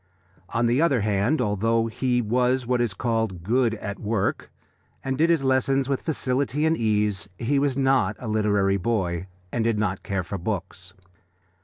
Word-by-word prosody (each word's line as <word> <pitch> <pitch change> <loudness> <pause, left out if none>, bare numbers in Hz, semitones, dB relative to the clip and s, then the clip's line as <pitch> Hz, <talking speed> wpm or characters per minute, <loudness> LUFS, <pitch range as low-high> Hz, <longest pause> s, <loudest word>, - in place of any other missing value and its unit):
On 115 +1 0
the 120 +5 +2
other 140 -9 +3
hand, 105 +8 +1
although 115 +1 +1
he 125 +2 0
was 125 +3 +1
what 125 0 +1
is 115 -5 -1
called 110 -6 -1
"good 115 +3 +2
at 100 -2 -6
work," 105 -2 -2 0.5
and 135 0 -1
did 160 +5 +2
his 165 -5 +2
lessons 135 0 +2
with 140 -1 -1
facility 140 -1 0
and 160 +1 +3
ease, 105 -4 0
he 135 +4 +1
was 140 -2 0
not 135 -7 +2
a 125 - -8
literary 105 -2 +2
boy, 95 -4 -1 0.2
and 120 - 0
did 115 -1 +1
not 100 -3 -1
care 95 -3 -2
for 95 +2 -5
books. 95 -1 -5
115 Hz, 170 wpm, -24 LUFS, 100-130 Hz, 0.5 s, other